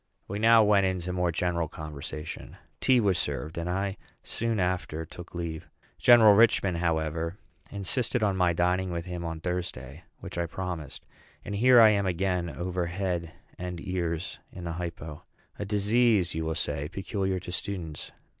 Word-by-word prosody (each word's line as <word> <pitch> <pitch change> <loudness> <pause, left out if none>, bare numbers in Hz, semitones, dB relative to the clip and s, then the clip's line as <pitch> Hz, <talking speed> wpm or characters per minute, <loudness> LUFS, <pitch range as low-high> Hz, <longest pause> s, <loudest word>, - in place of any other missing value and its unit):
We 100 +2 -4
now 115 0 +7
went 100 -2 +4
into 90 -1 -2
more 90 -1 +1
general 85 0 0
conversation. 75 +1 -7 0.2
Tea 130 -2 +4
was 100 -6 +2
served; 70 +3 -3
and 85 +1 -3
I 95 +2 -1 0.3
soon 115 -2 -2
after 90 -3 -1
took 90 +2 -11
leave. 85 -2 -5 0.3
General 120 -4 +8
Richman, 100 -3 +4
however, 80 +1 -1 0.3
insisted 110 +4 -1
on 100 -2 +2
my 90 -2 +3
dining 90 +2 +1
with 85 -1 -3
him 90 -1 -5
on 80 -1 -4
Thursday; 85 -5 -4 0.2
which - - -7
I 85 - 0
promised. 85 -5 -6 0.4
And 105 - -4
here 120 +4 +6
I 110 -1 +9
am 100 -2 +2
again 90 -1 0
over 90 0 -3
head 90 -2 -2 0.3
and 90 -1 -5
ears 85 -2 -3
in 90 - -9
the 85 - -3
hypo 80 -3 -6 0.4
a 105 - -2
disease, 105 -1 +2
you 80 0 -2
will 80 0 -1
say, 75 -2 -2
peculiar 95 0 -2
to 90 - -8
students. 90 -6 -5
90 Hz, 165 wpm, -28 LUFS, 85-100 Hz, 0.4 s, I